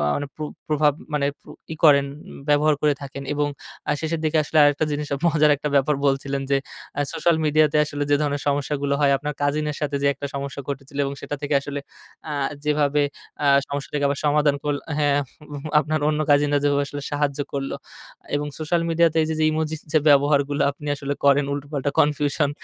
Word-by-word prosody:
মানে 145 -1 -3
প্র 155 - -11 0.3
প্রভাব 150 -1 +3 0.2
মানে 145 -1 +1 0.2
প্র - - -26 0.3
ই - - -7
করেন 140 -2 +6 0.4
ব্যবহার 150 +1 +4
করে 150 -1 +3
থাকেন। 140 0 -7
উম - - -7
এবং 145 0 0 0.4
আ - - +3
শেষের 160 0 -2
দিকে 155 0 +1
আসলে 155 - -2
আরেকটা 145 +2 +3
জিনিস 145 0 -2
আ - - -5
মজার 155 -2 +4
একটা 150 +1 -3
ব্যাপার 140 +2 +3
বলছিলেন 135 0 0
যে, 140 - +4 0.4
আ - - +3
সোশ্যাল 165 +1 +2
মিডিয়া 155 +1 +4
তে - - +2
আসলে 145 -1 -3
যে - - +6
ধরনের 145 -1 -1
সমস্যাগুলো 140 0 0
হয় 140 -1 +4
আপনার 150 +1 -4
কাজিন 150 +1 +1
এর - - -8
সাথে 145 -1 -1
যে 140 - +3
একটা 140 - -5
সমস্যা 140 0 -4
ঘটেছিলো 140 0 -6
এবং 140 - -3
সেটা 145 - -4
থেকে 145 0 -2
আসলে 145 0 -5 0.5
আ - - -3 0.3
যেভাবে 150 -1 +2 0.4
আ - - +2 0.2
সমস্যাটাকে 145 0 -2
আবার 140 +1 -1
সমাধান 145 -1 +3
করল 145 -1 0 0.2
হ্যাঁ। 145 -1 +3
আপ 135 - -8 0.3
হু - - -5 0.2
আপনার 155 0 -1
অন্য 150 0 0
কাজিনরা 145 0 +4
যেভাবে 145 0 +2
আসলে 145 0 -6
সাহায্য 145 -1 -1
করলো। 135 -1 -2 0.6
এবং 145 0 -1
সোশ্যাল 165 +2 0
মিডিয়া 165 +1 +4
তে - - -1
এই - - -2
যে 155 - +3
ইমোজিস 155 0 -2
যে 155 - +4
ব্যবহারগুলো 145 0 +3
আপনি 145 +1 -10
আসলে 140 0 -3
করেন 140 0 +5
উল্টোপাল্টা 145 0 -3
কনফিউশন 145 0 +2
145 Hz, 200 wpm, -23 LUFS, 140-150 Hz, 0.6 s, করেন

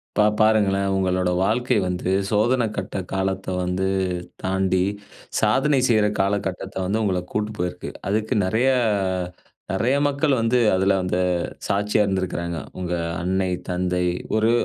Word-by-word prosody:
இப்ப 105 - +4 0.2
பாருங்களேன் 100 -3 +3
உங்களோட 90 -1 +1
வாழ்க்கை 120 +5 +1
வந்து 90 0 -2 0.2
சோதன 120 +4 +2
கட்ட 95 -1 -4 0.2
காலத்த 95 0 -1 0.2
வந்து 90 +1 -1 0.6
தாண்டி, 95 -1 +1 0.6
சாதனை 135 +7 +3
செய்ற 110 -4 +3
காலகட்டத்த 95 -1 -1
வந்து 100 +4 0
உங்கள 95 -4 +1
கூட்டு 105 0 -1
போயிருக்கு. 90 0 -3 0.2
அதுக்கு 110 +2 0
நெறைய 110 +8 +2 1.0
அ - - -1
நெறைய 115 +8 +1
மக்கள் 145 +1 +1
வந்து 115 +2 +2 0.2
அதுல 95 +1 +3
அந்த 90 0 -1 0.5
சாட்சியா 105 +1 +1
இருந்திருக்குறாங்க. 90 -3 -2 0.2
உங்க 90 -1 -2 0.3
அன்னை, 95 +1 0 0.2
தந்தை 90 0 0 0.3
ஒரு 110 +1 +3
95 Hz, 125 wpm, -23 LUFS, 95-110 Hz, 1.0 s, இப்ப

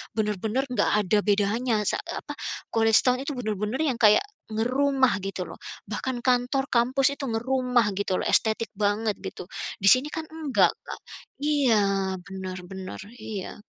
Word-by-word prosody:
bener-bener 215 +4 0
nggak - - +2 0.2
ada 210 +4 +3
bedanya 215 +4 +1
sa - - 0
eee, - - -6
apa, - - -5 0.4
College 225 -1 +5
Town 250 0 +3
itu 280 0 -4
bener-bener 215 +2 -2
yang 255 -5 -1
kayak 210 - +6 0.3
ngerumah 260 +3 +2
gitu 195 -2 -4
loh, - - -9 0.3
bahkan 260 -2 -3
kantor 255 +2 +1
kampus 260 +3 +2
itu 280 - -8
ngerumah 250 -1 +1
gitu 195 -2 0
loh, - - -2
estetik 220 +1 +2
banget 210 +1 +1
gitu. 175 - -7 0.3
Di 195 - +1
sini 255 +7 +6
kan 320 -1 -5
enggak, 315 -4 +2
Kak. - - -7 0.4
Iya, 285 -5 +3 0.5
benar 190 -1 -6
benar, 190 0 -7 0.2
iya. 210 -3 -7
230 Hz, 155 wpm, -26 LUFS, 210-260 Hz, 0.5 s, kayak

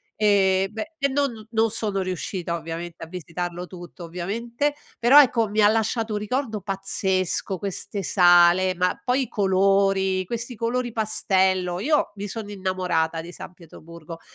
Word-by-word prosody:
e 195 -2 +3
beh 220 +9 -6
e 280 - +2
non 270 -5 -1
non 225 -1 +2
sono 205 -3 -2
riuscita 185 -1 -4
ovviamente 165 +1 -6
a - - -8
visitarlo 175 0 -5
tutto 175 -1 -11
ovviamente, 230 - -3 0.2
però 245 +5 +7
ecco 235 -6 +4
mi 210 +1 -2
ha 205 - +7
lasciato 220 +1 0
un 210 - -1
ricordo 220 0 -2
pazzesco 190 -1 -2
queste 200 +1 -5
sale, 175 0 +5
ma 180 +1 0
poi 255 +2 +1
i - - -6
colori, 195 -1 +2
questi 235 +4 -5
colori 240 +2 -2
pastello, 190 -5 +1
io 295 +9 +1
mi 205 0 -5
sono 210 0 -6
innamorata 180 -4 -1
di 170 +2 -10
San 180 - -10
Pietroburgo 165 -1 -12
195 Hz, 150 wpm, -24 LUFS, 180-220 Hz, 0.2 s, però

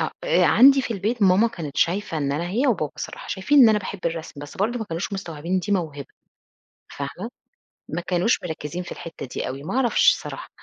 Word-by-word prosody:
آه، - - 0
آآ - - +3
عندي 270 +2 +6
في 235 - -3
البيت 215 +4 -2
ماما 195 +4 +5
كانت 155 -9 -7
شايفة 185 0 0
إن 140 -1 -1
أنا 165 +5 -2
هي 240 +9 +1
وبابا 175 - 0
الصراحة - - -7
شايفين 205 +10 +2
إن 250 -4 +9
أنا 215 -1 +4
باحب 200 0 -6
الرسم 165 -3 -5
بس 145 - -10
برضه 225 +5 0
ما 220 - -3
كانوش 170 +1 -4
مستوعبين 170 -4 -5
إن 190 - +3
دي 205 +3 -2
موهبة 155 -8 -2 0.8
فاهمة، - - -6 0.6
ما 165 - -3
كانوش 180 +5 +1
مركّزين 160 0 -5
في 180 - -8
الحتّه 165 -5 -8
دي 125 - -4
أوي 135 +2 -6
ما 185 - -4
أعرفش 255 -3 +4
الصراحة، - - -8
185 Hz, 210 wpm, -23 LUFS, 160-220 Hz, 0.8 s, إن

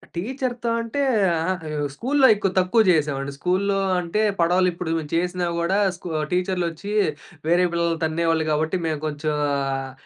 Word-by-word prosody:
టీచర్‌తో 240 +4 -3
అంటే, 230 +5 -4 0.3
అహా! 165 0 0 0.2
అయ్యో! 150 -1 -3 0.2
స్కూల్లో 265 - +3
ఎక్కువ 200 -2 -1
తక్కువ 185 +5 +3
చేసేవాడిని. 145 -4 +1
స్కూల్లో 190 +5 0 0.2
అంటే 175 +4 -2 0.2
పడవలిప్పుడు 175 0 +1 0.2
చేసినా 180 +1 0
గూడా, 170 +3 +1 0.2
స్కు 175 0 -9 0.2
టీచర్లొచ్చి 180 0 -2 0.6
వేరే 175 +2 +4
పిల్లల్ని 170 -1 0
తన్నేవాళ్ళు 160 0 +1
కాబట్టి, 155 +4 0
మేము 155 -2 -2
కొంచెం 150 0 -2 0.2
ఆహ్, 135 -1 -2
170 Hz, 130 wpm, -23 LUFS, 160-190 Hz, 0.6 s, వేరే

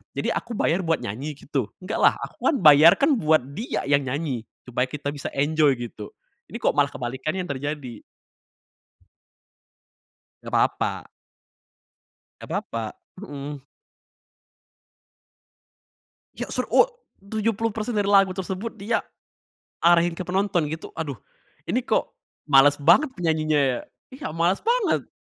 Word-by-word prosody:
jadi - - -1
aku 235 - -4
bayar 170 - +1
buat 165 -3 0
nyanyi 135 +9 -5
gitu? 135 -4 -3 0.2
Nggak 210 +4 -3
lah, - - +6
aku - - -8
kan - - +2
bayar 150 +2 +9
kan 285 +2 +4
buat 155 - +3
dia 220 - -3
yang 140 -1 +2
nyanyi 130 -4 -3 0.2
supaya 125 +1 0
kita 145 +1 -4
bisa 145 -1 -6
enjoy 145 0 +3
gitu, 115 -3 -8 0.4
ini - - -11
kok - - +3
malah 145 -1 +5
kebalikannya 130 +9 -3
yang 175 - -5
terjadi. 140 -4 -5 2.4
Nggak - - -9
apa-apa. - - 0 1.4
Nggak - - -10
apa-apa, 115 -2 -5 0.2
mhm. 145 -5 -7 2.7
Ya - - -5
ser - - -2
o - - +6 0.3
tujuh 215 +3 -1
puluh 225 +1 -2
persen 220 +2 -3
dari 205 -1 +1
lagu 195 -2 +5
tersebut, 190 +4 -5
dia 205 +4 -1 0.8
arahin 170 0 +4
ke 165 - -6
penonton 185 -3 +1
gitu, 160 +1 -6
aduh 150 -4 -4 0.5
ini - - +1
kok - - 0 0.4
males 145 0 +6
banget 175 - +5
penyanyinya 155 -3 +1
ya, 130 -3 +1 0.3
iya 270 - -6
males 170 +4 +1
banget. 470 -1 +1
155 Hz, 135 wpm, -24 LUFS, 140-190 Hz, 2.7 s, bayar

